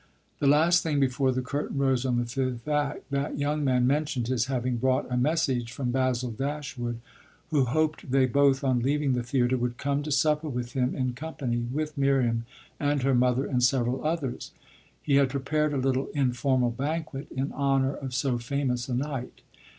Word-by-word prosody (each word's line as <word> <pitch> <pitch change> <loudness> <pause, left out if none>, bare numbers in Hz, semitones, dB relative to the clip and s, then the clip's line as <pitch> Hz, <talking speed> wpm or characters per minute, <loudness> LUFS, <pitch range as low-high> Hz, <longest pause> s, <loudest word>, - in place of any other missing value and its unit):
The 140 - +2
last 160 +5 +5
thing 150 -3 0
before 130 0 +2
the 130 0 -2
curtain 140 +2 -3
rose 135 -2 +1
on 125 -1 +1
the 120 - 0
fifth 125 +1 -3
act 145 -2 -1
that 140 +1 -1
young 145 +1 0
man 125 -2 +2
mentioned 135 -3 0
his 125 -3 +1
having 130 -2 -1
brought 130 +2 +1
a - - +1
message 130 -3 +1
from 125 0 -2
Basil 130 -1 0
Dashwood, 135 -2 -4 0.5
who 145 -4 +3
hoped 155 +3 -1
they 130 0 +4
both, 135 +2 +3
on 130 -2 +2
leaving 140 +2 +1
the 125 - 0
theatre, 125 +1 +1
would 120 0 -2
come 140 0 -1
to 150 +1 -5
supper 150 +3 +2
with 125 -2 -4
him 125 -1 0
in 130 -2 -1
company 130 -3 -3
with 145 +6 -3
Miriam 125 -4 +2 0.3
and 145 -2 0
her 135 0 +3
mother 125 +2 +2
and 125 -3 0
several 125 0 +1
others: 155 -5 -3 0.5
he 140 -2 +3
had 140 -2 +4
prepared 150 +3 0
a 145 - -1
little 130 0 0
informal 130 -2 +1
banquet 145 +2 -3
in 135 +2 -3
honour 135 -1 +1
of 130 -3 -6
so 125 0 0
famous 125 0 -2
a 125 - 0
night. 135 -1 -4
135 Hz, 185 wpm, -27 LUFS, 125-145 Hz, 0.5 s, last